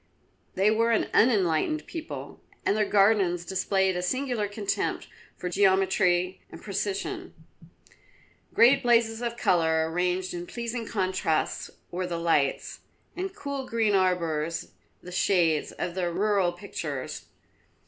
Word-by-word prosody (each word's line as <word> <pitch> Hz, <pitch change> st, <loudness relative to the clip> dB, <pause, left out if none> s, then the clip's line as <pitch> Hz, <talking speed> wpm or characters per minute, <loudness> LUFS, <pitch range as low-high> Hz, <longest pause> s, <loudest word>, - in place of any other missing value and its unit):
They 195 Hz, +3 st, +3 dB
were 230 Hz, +1 st, +2 dB
an 230 Hz, -, +1 dB
unenlightened 215 Hz, -, +2 dB
people, 330 Hz, -2 st, -7 dB, 0.2 s
and 200 Hz, -, +2 dB
their 210 Hz, -1 st, +1 dB
gardens 195 Hz, -4 st, +3 dB
displayed 190 Hz, 0 st, +1 dB
a 180 Hz, -, -1 dB
singular 245 Hz, +1 st, -1 dB
contempt 205 Hz, 0 st, -2 dB, 0.3 s
for 180 Hz, -, -4 dB
geometry 185 Hz, -1 st, +2 dB
and -, -, -10 dB
precision. 210 Hz, -, -4 dB, 1.2 s
Great 250 Hz, +4 st, +5 dB
blazes 235 Hz, -2 st, +2 dB
of 235 Hz, -1 st, -3 dB
colour 160 Hz, -5 st, +2 dB
arranged 180 Hz, +2 st, -1 dB
in 175 Hz, 0 st, -6 dB
pleasing 235 Hz, -1 st, -4 dB
contrasts 185 Hz, -5 st, -1 dB, 0.2 s
were 180 Hz, +1 st, -2 dB
the 170 Hz, -1 st, -3 dB
lights, 165 Hz, -5 st, 0 dB, 0.4 s
and 380 Hz, +1 st, -4 dB
cool 280 Hz, -8 st, -5 dB
green 225 Hz, -3 st, +1 dB
arbours 170 Hz, -4 st, 0 dB, 0.3 s
the 180 Hz, -, -9 dB
shades 170 Hz, -4 st, +2 dB
of 175 Hz, -, -4 dB
their 175 Hz, -1 st, -1 dB
rural 195 Hz, 0 st, +2 dB
pictures. 170 Hz, -7 st, -6 dB
190 Hz, 125 wpm, -27 LUFS, 175-225 Hz, 1.2 s, Great